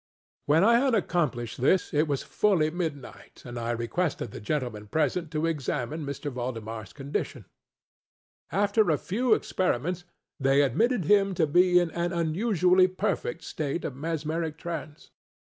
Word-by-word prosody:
When 155 +4 +4
I 235 +3 +6
had 265 -2 +2
accomplished 130 - -1
this, 180 +8 +2
it 150 +2 +2
was 140 -2 -1
fully 175 -7 +2
midnight, 160 -6 -6
and 120 -1 -6
I 115 0 -3
requested 120 - -2
the - - -8
gentlemen 115 -4 -3
present 160 - 0
to 155 0 -1
examine 150 -2 -2
M. 145 - -6
ValdemarŌĆÖs 120 - -5
condition. 140 +1 -4 1.1
After 205 +1 +2
a 155 - +3
few 220 - +1
experiments, 175 +1 -1 0.3
they 135 +1 +4
admitted 220 - +1
him 200 +1 +3
to 165 - +3
be 180 +4 +4
an 175 -2 +2
unusually 175 +2 +2
perfect 170 -2 -2
state 155 +1 -3
of 135 - -4
mesmeric 160 +1 -3
trance. 160 -3 -7
160 Hz, 140 wpm, -27 LUFS, 135-180 Hz, 1.1 s, I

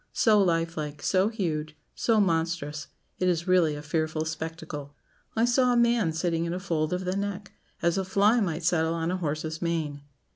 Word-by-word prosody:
So 215 -2 +4
life 165 -3 +1
like, 150 -1 -5
so 190 +1 +3
huge, 155 -8 -3 0.2
so 225 -2 +2
monstrous; 165 -5 0 0.3
it 185 - +1
is 170 0 -1
really 175 -5 +3
a 145 - -7
fearful 155 0 -1
spectacle. 160 -3 -6 0.4
I 225 +1 +3
saw 250 +1 +3
a - - +2
man 235 -7 +3
sitting 165 0 -1
in 170 +1 -2
a - - -3
fold 160 -4 -1
of 180 +1 -2
the 185 +1 -1
neck 200 0 -4 0.3
as 170 +2 +2
a - - 0
fly 200 +5 +3
might 170 -5 -1
settle 165 -1 +2
on 165 +1 -1
a 185 - -1
horse's 155 -1 -3
mane. 160 -4 -2
170 Hz, 190 wpm, -27 LUFS, 160-190 Hz, 0.4 s, So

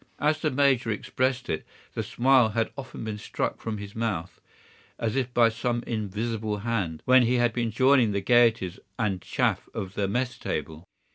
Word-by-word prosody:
As 155 +1 +1
the 155 - +2
major 135 -4 +2
expressed 130 +4 -1
it, 80 - -2 0.3
the - - -2
smile 125 -2 +3
had 115 - +1
often 130 -4 -7
been 110 -1 -4
struck - - -3
from 110 -2 -3
his 100 0 -8
mouth, 105 -6 -3 0.6
as 115 0 -2
if 130 -2 -1
by 120 -1 +5
some 120 +1 -2
invisible 110 0 -2
hand, 95 -9 -2
when 130 0 +6
he 120 +1 +2
has 120 -1 +3
been 115 0 -1
joining 130 0 +4
the 100 - 0
gayeties 110 -4 +3 0.2
and 100 -5 -1
chaff - - -1
of 95 -1 -4
the 100 -1 -1
mess 125 +4 -2
table. 80 +3 -4
115 Hz, 180 wpm, -26 LUFS, 105-125 Hz, 0.6 s, when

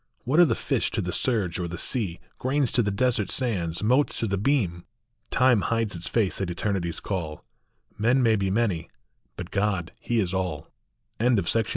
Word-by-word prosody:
What 140 +7 +2
are 175 - +9
the - - +1
fish - - 0
to - - +2
the - - -3
surge 105 -10 0
or 90 - -2
the 85 +1 -6
sea, 95 -5 0 0.2
Grains 135 0 +1
to 120 - +3
the 105 - 0
desert 105 -2 +1
sands, 95 -10 -1
motes 130 +6 +2
to - - 0
the 100 -2 0
beam? 100 -9 +1 0.5
Time 125 -4 +4
hides 115 -4 -1
its 85 - -4
face 105 -4 0
at 95 - -1
Eternity 90 -1 -1
s 85 - -5
call; 80 -6 -4 0.5
Men 120 +4 +3
may 115 -2 +4
be 100 -2 0
many, 100 -6 0 0.5
but 90 -1 -7
God 100 -4 0
he 120 -1 0
is 95 -3 0
all. 90 -6 -3 0.5
AT 115 -3 +3
FLOOD. 115 -1 +1
105 Hz, 195 wpm, -26 LUFS, 90-120 Hz, 0.5 s, are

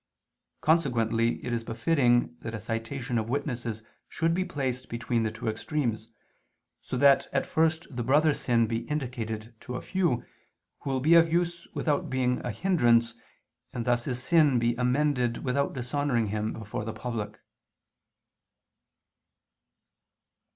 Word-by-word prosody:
Consequently 120 -7 +2
it 120 - -2
is 115 -1 -1
befitting 120 0 +2
that 115 0 -5
a - - -5
citation 115 +2 -3
of 110 +1 -4
witnesses 120 -5 -3 0.3
should 165 +1 0
be 185 +2 +1
placed 130 -6 -3
between 115 0 -1
the 110 - 0
two 110 +2 -7
extremes, 115 -1 -2 0.7
so - - -4
that 140 +1 +5
at 135 - 0
first 160 0 +1
the 120 - -2
brother's 145 +5 +3
sin 115 -2 +2
be 115 0 -1
indicated 120 -6 -4
to 125 - -7
a - - -4
few, 170 -11 0 0.5
who - - -5
will 135 -1 0
be 155 +5 +4
of 165 -1 +6
use 175 0 0
without 150 -3 0
being 125 -1 0
a - - -2
hindrance, 120 - +3 0.6
and 120 -2 -3
thus 120 -1 +1
his 125 -1 -3
sin 155 -7 +4
be 120 0 +2
amended 125 -1 +1
without 140 +2 0
dishonoring 125 -3 0
him 105 +1 -1
before 110 -1 -5
the 110 +1 -4
public. 110 -2 -5
125 Hz, 145 wpm, -28 LUFS, 115-145 Hz, 0.7 s, of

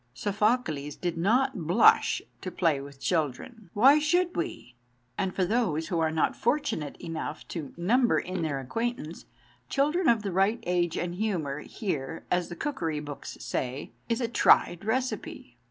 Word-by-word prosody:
"Sophocles 200 - 0
did 175 -2 -3
not 220 - +1
blush 435 - +5 0.2
to - - -4
play 160 -7 +1
with 140 0 -11
children." 170 - -2
Why 270 +8 +7
should 350 +4 +1
we? 340 - -4 0.4
And 190 +6 -1
for 185 - +2
those 175 -7 0
who 170 - 0
are 160 -1 +2
not 160 0 +1
fortunate 220 - -1
enough 160 -2 -6
to 160 -5 -5
number 235 +8 +3
in 185 -1 -3
their 150 -4 -1
acquaintance 170 - -4 0.4
children 300 +6 +2
of 230 -3 +3
the 200 - -2
right 195 +5 +2
age 175 -2 0
and 175 0 -2
humour, 175 -8 -2
here, 165 - -4
as 180 -1 +1
the 175 - -6
cookery 165 - -2
books 145 -1 -7
say, 130 +3 -3 0.2
is 230 +1 +1
a 235 - +1
tried 185 -5 +4
receipt. 255 +4 -3
180 Hz, 155 wpm, -28 LUFS, 155-235 Hz, 0.4 s, Why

